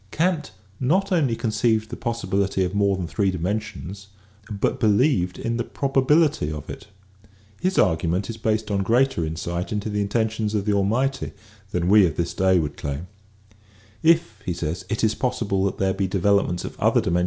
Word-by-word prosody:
Kant 160 - 0 0.3
not 190 +10 +1
only 145 -10 +2
conceived 110 -1 0
the - - -3
possibility 100 -5 -1
of 90 +1 -2
more 100 -1 +2
than 90 - -3
three 100 +3 0
dimensions 95 0 -4 0.4
but 105 +4 -1
believed 105 - +2
in 115 0 -2
the 120 - -1
probability 140 - +2
of 75 -1 -6
it. 100 - -10 0.7
His 185 +1 0
argument 85 +3 +2
is 115 - -5
based 110 -1 -1
on 100 -1 +1
greater 120 -2 +2
insight 85 +3 -3
into 105 0 -2
the 105 0 0
in 100 - -2
tentions 110 -1 0
of 100 -2 -1
the 105 - +2
Almighty 120 +7 0 0.4
than 90 -3 -1
we 100 -1 +6
of 80 - -4
this 85 +1 -2
day 95 +1 +3
would 75 -4 -2
claim: 70 +5 -5 0.5
" 100 -1 -29
If 160 - +3
it 85 +5 -3
is 110 -1 +3
possible 110 -7 -1
that 100 - -2
there 95 -1 +1
be 95 0 -1
developments 95 -1 +1
of - - -8
other - - +3
dimen. 85 +1 +1
100 Hz, 175 wpm, -23 LUFS, 90-115 Hz, 0.7 s, we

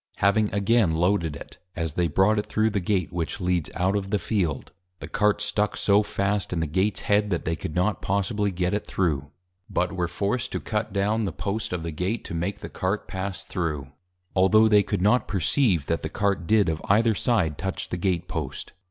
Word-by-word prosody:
Having 105 +2 +2
again 100 -3 +2
Loaded 85 -2 +1
it, - - -11 0.2
as 80 -3 -2
they 85 +1 +1
brought 95 +7 +3
it 105 - -4
thro' 110 +1 +1
the 100 - 0
Gate 90 -2 -1
which 85 -2 -3
Leads 90 -4 0
out 95 +2 +1
of 100 -1 -2
the 105 - +2
Field, 85 - -2 0.3
the - - -7
Cart 105 0 +1
stuck 105 0 0
so 100 0 +4
fast 100 -1 -1
in 90 - -1
the 80 - +1
Gates 95 +7 0
Head, 105 0 +2
that 85 -4 -2
they 80 - 0
could 75 +1 -6
not 90 +1 +1
possibly 100 +1 0
get 90 0 -1
it 105 - -2
thro', 75 -6 -1 0.4
but 90 - 0
were 90 -2 -1
forced 105 +7 -2
to - - -1
cut 110 -1 -2
down 105 +3 +1
the 95 - -2
Post 100 +4 -3
of 90 -2 -3
the 85 - -3
Gate, 90 +9 -2
to - - -6
make 85 +4 -3
the - - -5
Cart 95 +3 -2
pass 95 0 -4
thro', 75 -6 -3 0.4
altho' 110 +4 +5
they 105 -1 +6
could 90 - -2
not 105 +4 +3
perceive 95 - +2
that 85 +2 -1
the 80 - -4
Cart 100 -2 -1
did 110 -2 +4
of 80 0 -1
either 110 +3 +4
side 95 - 0
touch 95 0 -3
the - - -2
Gate 90 -1 -1
Post. - - -5
95 Hz, 215 wpm, -25 LUFS, 85-105 Hz, 0.4 s, they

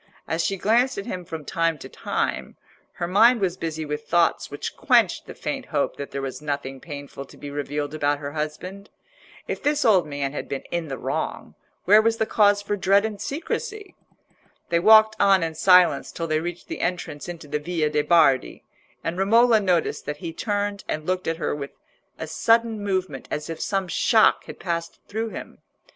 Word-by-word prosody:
As 165 +1 -1
she 195 - -1
glanced 235 +7 +2
at 200 - -4
him 180 -1 -5
from 160 -3 -7
time 165 +1 0
to - - -9
time, - - -3 0.4
her 170 - -3
mind 225 +6 +5
was 185 -3 0
busy 160 -2 -4
with 150 0 -5
thoughts 170 -1 +2
which - - -5
quenched - - +2
the - - -9
faint - - -4
hope - - -1
that 140 - -6
there 140 - -5
was 135 +2 -5
nothing 140 -2 -4
painful 145 -2 -8
to - - -17
be 145 - -8
revealed 145 0 -3
about 145 -1 +1
her 145 0 -6
husband. 170 +6 -5 0.6
If - - -4
this 295 -1 +1
old 190 -8 +4
man 140 -1 -3
had - - -5
been 135 - -4
in 170 -2 -2
the 135 -2 -5
wrong, - - -4 0.3
where 210 +4 +7
was 225 +1 +1
the 220 - +1
cause 205 -2 +3
for 205 0 -1
dread 200 +1 +3
and 210 -2 -5
secrecy! 405 - -4 0.8
They 170 - +2
walked 215 +3 +7
on 195 -3 +5
in 165 -1 -2
silence 180 +2 +4
till 165 - -4
they 155 -1 0
reached 175 +1 -6
the - - -5
entrance 175 -3 -3
into 165 -3 -8
the 150 +1 -2
Via 155 -1 -1
de' 150 0 +2
Bardi, 155 -5 +3 0.4
and 170 +2 -3
Romola 225 +3 +5
noticed 180 -5 0
that 150 - -3
he 165 +1 -6
turned 205 +1 -2
and 155 0 -3
looked 185 +1 -1
at 165 0 -1
her - - -2
with 140 -1 -6 0.4
a - - -5
sudden 225 +6 +2
movement 185 -8 -2
as 150 +2 -4
if 165 - -6
some 195 -2 -1
shock 220 +5 +3
had - - -10
passed 170 -2 -4
through 225 +2 -3
him. - - -9
175 Hz, 195 wpm, -24 LUFS, 150-205 Hz, 0.8 s, where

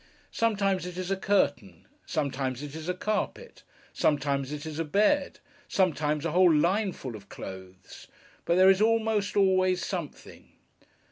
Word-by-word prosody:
Sometimes, 200 -5 0
it 180 0 -8
is 185 +1 -4
a - - +2
curtain; 145 - 0 0.2
sometimes, 135 -3 -2
it 145 -1 -7
is 160 +2 -6
a 180 - -1
carpet; 215 - -3 0.3
sometimes, 140 -2 0
it 150 +1 -6
is 155 0 -6
a - - +1
bed; 210 - +1 0.3
sometimes, 155 -5 0
a 165 - -1
whole 180 +1 +5
line 185 +7 +2
full 130 -8 -8
of 100 -1 -13
clothes; 95 -1 -10 0.4
but 170 - +1
there 185 +1 +7
is 190 +1 +1
almost 220 -2 +1
always 185 -2 +3
something. 175 -7 -7
175 Hz, 150 wpm, -28 LUFS, 145-195 Hz, 0.4 s, there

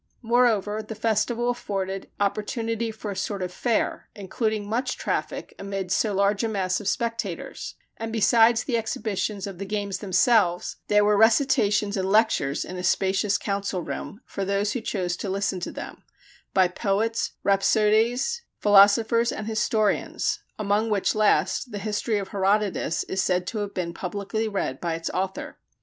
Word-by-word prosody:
Moreover 225 -3 +2
the 220 +1 -8
festival 230 +2 0
afforded 195 -5 -4
opportunity 225 +3 -1
for 215 -1 -6
a - - -5
sort 200 0 -3
of 180 0 -5
fair, 235 +1 -1
including 210 +1 -2
much 245 +4 -1
traffic - - -3
amid 195 -2 -4
so 215 +2 +2
large 200 +2 +1
a - - +1
mass 190 -4 -1
of 205 - -6
spectators; 230 +2 -3 0.2
and 225 0 -5
besides 230 +1 +4
the 240 -4 0
exhibitions 210 -2 -3
of 195 -3 -8
the - - -3
games 200 -1 -2
themselves, 185 -2 +2
there 210 0 +4
were 210 0 +4
recitations 215 -3 +3
and 190 0 -1
lectures 195 -10 +2
in 185 - -7
a 180 - -5
spacious 195 +2 +2
council 200 -3 -2
room 205 +7 -6
for 195 - -4
those 200 +1 0
who 245 - -3
chose 180 -5 -2
to 200 - -4
listen 195 -1 -1
to 175 - -4
them, - - -8 0.5
by 190 -2 +4
poets, 210 +5 -1
rhapsodes, 220 - +2 0.2
philosophers 215 +3 +5
and 215 - -5
historians 215 -1 0 0.2
among 210 +1 +1
which 205 -3 +1
last 215 +3 +2
the 205 - -4
history 210 +1 -1
of 195 -1 -4
Herodotus 195 -3 0
is 190 - -2
said 180 -1 +1
to 215 - -3
have 205 -1 -4
been 170 -2 -2
publicly 200 +5 -3
read 195 -10 -3
by 170 -2 -1
its 165 0 -4
author. 190 +1 -4
205 Hz, 160 wpm, -25 LUFS, 195-225 Hz, 0.5 s, philosophers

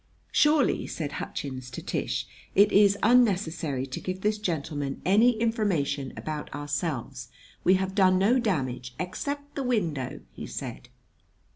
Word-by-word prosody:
"Surely," 295 -2 +3
said 150 -3 -4
Hutchins 130 -3 -5
to 125 - -7
Tish, - - -2 0.3
"it 200 +1 +6
is 200 0 +5
unnecessary 180 - +2
to 135 - -6
give 185 0 -4
this 210 +1 +1
gentleman 150 -7 -3
any 220 +5 +4
information 190 - 0
about 155 -1 -5
ourselves! 145 -4 -3 0.3
We 185 - +5
have 190 0 -1
done 185 -2 +4
no 215 +7 +4
damage 130 - -2
" - - -27
"Except 285 +10 -4
the 280 - -3
window," 170 - -1
he - - -7
said. - - -7
185 Hz, 140 wpm, -27 LUFS, 140-215 Hz, 0.3 s, it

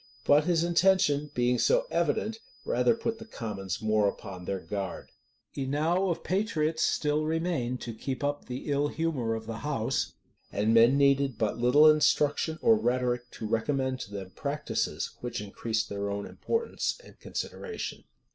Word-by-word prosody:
But 145 +1 +5
his 170 -2 +2
intention, 170 -4 +3
being 125 0 +2
so - - +3
evident, 225 +1 0 0.3
rather 125 - +3
put 230 0 -3
the 225 - -9
commons 105 - -5
more 110 -1 +3
upon 90 -2 -8
their 95 +1 -2
guard. 100 -1 -5 0.4
Enow 155 +8 +1
of 165 -1 -2
patriots 165 -6 0
still 150 0 +1
remained 155 -6 -1
to 115 - -5
keep 130 +5 -4
up 145 0 -1
the 125 +4 -5
ill 145 +1 +2
humor 145 -8 -1
of 110 0 -6
the 115 0 -5
house; 140 -7 -1 0.4
and 105 +3 +1
men 115 +4 +6
needed 140 -3 +3
but 110 +1 -1
little 135 +6 +6
instruction 155 +1 +3
or 225 - +6
rhetoric 125 - 0
to 110 - -6
recommend 130 +4 0
to 100 - -7
them 95 -2 -6
practices 145 +5 -2
which 120 0 -3
increased 110 +2 -2
their 100 -1 -3
own 100 0 -3
importance 460 +2 -2
and - - -16
consideration. 440 -2 -5
135 Hz, 155 wpm, -29 LUFS, 115-160 Hz, 0.4 s, men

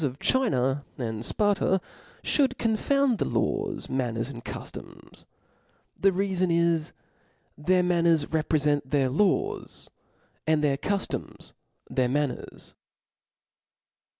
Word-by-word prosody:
of 135 -2 -1
China 140 - +1
and 110 -3 -3
Sparta 200 - +2 0.4
Ihould 270 -4 +2
confouftd 240 +2 +1
the - - +1
lawt,^ - - -1
manners, 120 -1 -2
aind 120 -1 -9
cuftoms: - - -9 0.7
the 195 - +4
reafen 190 -1 0
is, 170 -2 +2 0.6
their 180 +4 +2
man 175 -1 +2
ners 165 -3 +4
repreient 150 -2 +1
their 135 -1 +1
laws, 380 - 0 0.6
and 155 -1 +3
their 140 -2 +2
cufto'ms 200 +6 -3 0.4
cheir 130 -1 +2
manners. 145 0 -3
160 Hz, 105 wpm, -27 LUFS, 135-195 Hz, 0.7 s, the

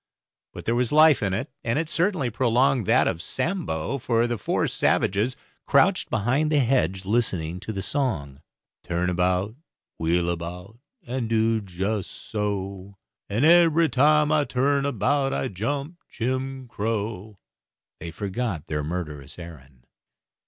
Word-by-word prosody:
But - - -9
there 115 - +1
was 120 0 0
life 155 -1 +6
in 100 -2 0
it, 100 - -4
and 115 +3 0
it 160 +1 0
certainly 170 - 0
prolonged 125 0 +2
that - - +4
of 80 - -2
Sambo, 140 - -2
for 115 -1 +1
as 120 - 0
the 120 -3 -2
four - - 0
savages 105 +7 +1 0.3
crouched - - +3
behind 135 +9 +1
the 150 - +3
hedge 95 - +1
listening 90 -6 0
to 95 +4 -6
the 95 -2 -4 1.0
"Turn 85 +1 -1
about 90 +2 +1
and 115 - -18 0.4
wheel 85 +2 +1
about, 90 +6 -7 0.3
and 120 -2 -3
do 115 0 +2
just 95 +2 -3
so, 100 -2 -4 0.3
And 115 +8 +1
ebery 165 -1 +5
time 150 +3 +4
I 155 -1 +3
turn 140 +1 +1
about 140 -1 +1
I 130 - -1
jump 140 - -4
Jim 130 +2 -3
Crow," 110 -2 -3 0.6
they 85 - -6
forgot 95 -1 -3
their 75 -3 -3
murderous 75 -4 -5
errand. 70 -7 -12
110 Hz, 145 wpm, -25 LUFS, 90-135 Hz, 1.0 s, life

